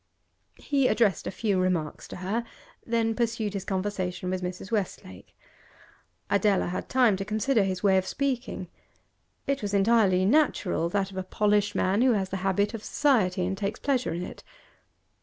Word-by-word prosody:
He 275 Hz, -3 st, +1 dB
addressed 210 Hz, -9 st, +2 dB
a -, -, 0 dB
few 200 Hz, -2 st, 0 dB
remarks 180 Hz, -5 st, -1 dB
to -, -, -8 dB
her, 200 Hz, +6 st, -2 dB, 0.4 s
then 230 Hz, -1 st, 0 dB
pursued 225 Hz, -2 st, -1 dB
his 195 Hz, -2 st, -3 dB
conversation 185 Hz, -2 st, -3 dB
with 185 Hz, 0 st, -2 dB
Mrs. 180 Hz, +3 st, -6 dB
Westlake. 185 Hz, -, -4 dB, 0.9 s
Adela 200 Hz, -, +2 dB
had 180 Hz, -, -4 dB
time 250 Hz, -6 st, +4 dB
to 195 Hz, -, -3 dB
consider 215 Hz, +4 st, +1 dB
his 190 Hz, -1 st, -2 dB
way 195 Hz, -2 st, +4 dB
of 185 Hz, -, -5 dB
speaking; 260 Hz, -8 st, -2 dB, 0.8 s
it 275 Hz, -1 st, -1 dB
was 205 Hz, -1 st, -2 dB
entirely 195 Hz, -3 st, +4 dB
natural, 210 Hz, -, +2 dB
that 195 Hz, +1 st, -1 dB
of 190 Hz, -, -10 dB
a 190 Hz, -, -2 dB
polished 205 Hz, +1 st, +1 dB
man 195 Hz, +4 st, +2 dB
who 255 Hz, -1 st, +5 dB
has 195 Hz, -3 st, -1 dB
the 195 Hz, -, -3 dB
habit 195 Hz, +3 st, 0 dB
of 220 Hz, -2 st, -6 dB
society, 195 Hz, -11 st, +2 dB
and 190 Hz, +1 st, -3 dB
takes 205 Hz, +1 st, -3 dB
pleasure 265 Hz, -3 st, 0 dB
in 170 Hz, +2 st, -3 dB
it. -, -, -9 dB
200 Hz, 170 wpm, -27 LUFS, 185-230 Hz, 0.9 s, who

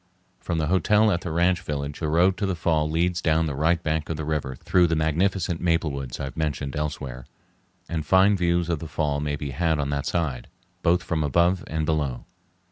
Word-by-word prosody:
From 85 Hz, -, -3 dB
the 80 Hz, -, 0 dB
hotel 105 Hz, +6 st, +3 dB
at 85 Hz, -2 st, 0 dB
the 90 Hz, -, -5 dB
ranch 85 Hz, +3 st, +2 dB
village 70 Hz, -4 st, -4 dB
the 80 Hz, -, -1 dB
road 85 Hz, +5 st, +3 dB
to 100 Hz, -, -1 dB
the 95 Hz, -, -1 dB
fall 80 Hz, -2 st, +1 dB
leads 85 Hz, +2 st, 0 dB
down 80 Hz, -1 st, +2 dB
the 75 Hz, -, -2 dB
right 80 Hz, +4 st, +1 dB
bank 80 Hz, -1 st, -1 dB
of 80 Hz, -, -2 dB
the 80 Hz, -, -4 dB
river 75 Hz, -4 st, -2 dB
through 90 Hz, +7 st, +2 dB
the 80 Hz, -, 0 dB
magnificent 85 Hz, +3 st, 0 dB
maple 85 Hz, -3 st, +1 dB
woods 70 Hz, -3 st, -5 dB
I -, -, -3 dB
have 70 Hz, -2 st, -6 dB
mentioned 75 Hz, -3 st, -2 dB
elsewhere, 70 Hz, -5 st, -4 dB, 0.6 s
and 80 Hz, -2 st, -3 dB
fine 95 Hz, +6 st, +4 dB
views 85 Hz, -2 st, +1 dB
of 85 Hz, -3 st, -1 dB
the 80 Hz, -, -6 dB
fall 75 Hz, -2 st, -1 dB
may 75 Hz, 0 st, -2 dB
be 70 Hz, -1 st, -5 dB
had 80 Hz, +3 st, +1 dB
on 70 Hz, -1 st, -2 dB
that 70 Hz, -1 st, -2 dB
side, 75 Hz, -8 st, -2 dB, 0.3 s
both 90 Hz, +1 st, +2 dB
from 80 Hz, -2 st, -1 dB
above 85 Hz, +5 st, +2 dB
and 80 Hz, 0 st, -2 dB
below. 75 Hz, -5 st, -1 dB
80 Hz, 215 wpm, -25 LUFS, 75-85 Hz, 0.6 s, fine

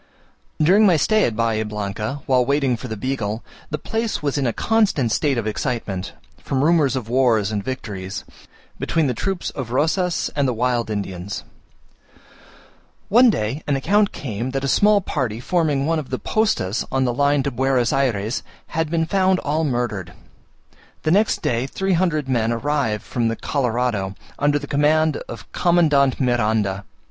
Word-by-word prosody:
During 195 Hz, +7 st, +5 dB
my 175 Hz, -4 st, +5 dB
stay 215 Hz, +8 st, +3 dB
at 115 Hz, -, -1 dB
Bahia 115 Hz, -1 st, +1 dB
Blanca, 105 Hz, +5 st, -4 dB
while 130 Hz, -2 st, +3 dB
waiting 140 Hz, -1 st, +1 dB
for 120 Hz, -, -7 dB
the 110 Hz, -2 st, -5 dB
Beagle, 115 Hz, -3 st, -3 dB, 0.3 s
the 150 Hz, -, -2 dB
place 225 Hz, +2 st, -3 dB
was 145 Hz, -2 st, 0 dB
in 140 Hz, -3 st, +1 dB
a -, -, +1 dB
constant 200 Hz, -, +1 dB
state 140 Hz, +1 st, +1 dB
of 115 Hz, -, -1 dB
excitement, 110 Hz, -4 st, -3 dB, 0.3 s
from 135 Hz, 0 st, -1 dB
rumours 150 Hz, -5 st, +3 dB
of 125 Hz, -4 st, -3 dB
wars 115 Hz, -4 st, +2 dB
and 105 Hz, -2 st, -2 dB
victories, 100 Hz, -6 st, -5 dB, 0.6 s
between 165 Hz, -2 st, +1 dB
the 130 Hz, -, 0 dB
troops 190 Hz, -, -3 dB
of 130 Hz, -4 st, -5 dB
Rosas 165 Hz, +6 st, 0 dB
and 140 Hz, -2 st, +2 dB
the 125 Hz, -, -1 dB
wild 120 Hz, -1 st, 0 dB
Indians. 100 Hz, -2 st, -4 dB, 1.7 s
One 245 Hz, +4 st, +6 dB
day 130 Hz, -, -1 dB
an 145 Hz, -, +2 dB
account 205 Hz, +9 st, +2 dB
came 120 Hz, -2 st, -4 dB
that 135 Hz, -, -3 dB
a -, -, 0 dB
small 205 Hz, +7 st, +4 dB
party 125 Hz, -, -2 dB
forming 150 Hz, -1 st, 0 dB
one 165 Hz, +1 st, +1 dB
of 145 Hz, -, -7 dB
the 130 Hz, -, -2 dB
postas 205 Hz, -, 0 dB
on 130 Hz, 0 st, +1 dB
the 120 Hz, -, 0 dB
line 140 Hz, +2 st, +2 dB
to 140 Hz, -, -1 dB
Buenos 130 Hz, -1 st, +1 dB
Ayres, 120 Hz, -4 st, 0 dB, 0.3 s
had 160 Hz, -1 st, -1 dB
been 165 Hz, 0 st, +1 dB
found 190 Hz, +2 st, +2 dB
all 155 Hz, +3 st, 0 dB
murdered. 120 Hz, -, -2 dB, 0.9 s
The 155 Hz, -, +1 dB
next 210 Hz, +5 st, +2 dB
day 120 Hz, +2 st, 0 dB
three 190 Hz, +6 st, -1 dB
hundred 165 Hz, -5 st, +1 dB
men 120 Hz, -3 st, +1 dB
arrived 115 Hz, -3 st, -1 dB
from 120 Hz, -2 st, -1 dB
the 115 Hz, -, -1 dB
Colorado, 120 Hz, -9 st, -1 dB, 0.2 s
under 145 Hz, 0 st, +3 dB
the 145 Hz, -, -5 dB
command 150 Hz, +2 st, +2 dB
of 115 Hz, -5 st, -9 dB
Commandant 150 Hz, -6 st, +3 dB
Miranda. 110 Hz, -6 st, +1 dB
130 Hz, 170 wpm, -21 LUFS, 115-155 Hz, 1.7 s, One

